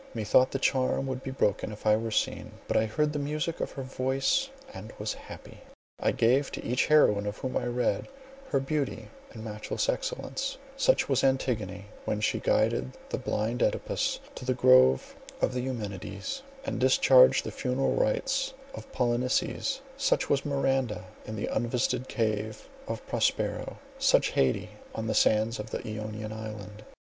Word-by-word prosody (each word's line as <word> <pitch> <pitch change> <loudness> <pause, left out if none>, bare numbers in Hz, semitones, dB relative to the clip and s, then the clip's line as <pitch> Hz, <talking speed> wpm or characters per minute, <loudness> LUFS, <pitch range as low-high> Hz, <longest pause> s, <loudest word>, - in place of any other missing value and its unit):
Methought 120 +4 +4
the - - -2
charm 130 0 +1
would 130 -1 -3
be 135 - -5
broken 105 -5 0
if 105 - -10
I 105 0 +6
were 115 +1 -2
seen, 110 - -1
but - - -1
I 110 - +3
heard 150 +7 0
the 145 - -1
music 155 +3 -2
of - - -3
her 135 - -5
voice 135 - 0 0.2
and 110 - -8
was 105 +1 -2
happy. - - -11 0.4
I - - +2
gave 130 +5 +2
to - - -5
each 125 +2 +1
heroine 105 -10 +4
of 105 - -3
whom 130 - -4
I - - 0
read, 120 0 0 0.4
her 135 - +2
beauty 135 -5 -2 0.2
and 110 - -9
matchless 105 - -3
excellences—such 275 - -1
was - - +2
Antigone, 125 -6 0 0.2
when 105 - -1
she 105 - +1
guided 65 +1 +1 0.2
the - - -2
blind 110 +3 -1
Œdipus - - 0 0.2
to - - -9
the 130 0 0
grove 130 - +5 0.2
of - - +1
the 125 - -1
Eumenides, 125 - -4 0.2
and 275 - -2
discharged 130 0 +6
the - - -3
funeral 130 +1 0
rites 270 - 0 0.2
of 270 - -9
Polynices; 125 - 0 0.2
such 275 - +1
was 140 -1 +2
Miranda 135 -7 0 0.2
in 110 - -5
the 105 - -2
unvisited 125 +2 0
cave 110 -2 -2 0.2
of - - -5
Prospero; - - -1 0.2
such - - +4
Haidee, 65 -1 +1 0.3
on 110 - -3
the 110 - 0
sands 110 +2 +3
of 105 +1 -5
the - - -4
Ionian 110 0 -5
island. 105 -1 -7
125 Hz, 165 wpm, -29 LUFS, 110-135 Hz, 0.4 s, I